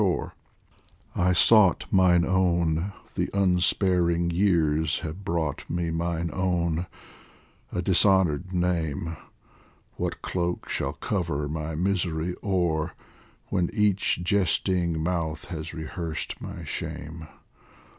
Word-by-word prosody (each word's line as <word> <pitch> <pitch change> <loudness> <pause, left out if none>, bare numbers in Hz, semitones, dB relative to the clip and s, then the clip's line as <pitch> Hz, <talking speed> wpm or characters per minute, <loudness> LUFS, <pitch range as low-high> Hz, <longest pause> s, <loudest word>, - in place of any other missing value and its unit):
67 95 -4 +2
POEMS - - -7 0.8
FROM - - -2
THE - - +3
I - - +4
sought 105 -1 +5
mine 90 -3 +4
own; 85 -1 +1 0.2
the - - -1
unsparing 90 -2 +3
years 80 -4 +2
Have 80 +5 -6
brought 80 -5 -2
me 85 -1 -1
mine 85 0 -2
own, 85 -2 0 0.8
a 90 - -2
dishonoured 95 -2 +3
name. 85 -3 -1 0.8
What - - -3
cloak 90 -1 -2
shall - - -2
cover 85 -7 -2
my 80 +1 -4
misery 90 -1 -1
o'er 85 -6 0 0.5
When 90 -3 0
each 105 -4 +1
jesting 90 -3 +1
mouth 80 -1 -2
has 80 -2 -5
rehearsed 80 0 -5
my - - -7
shame 80 +1 -6
85 Hz, 115 wpm, -26 LUFS, 80-95 Hz, 0.8 s, sought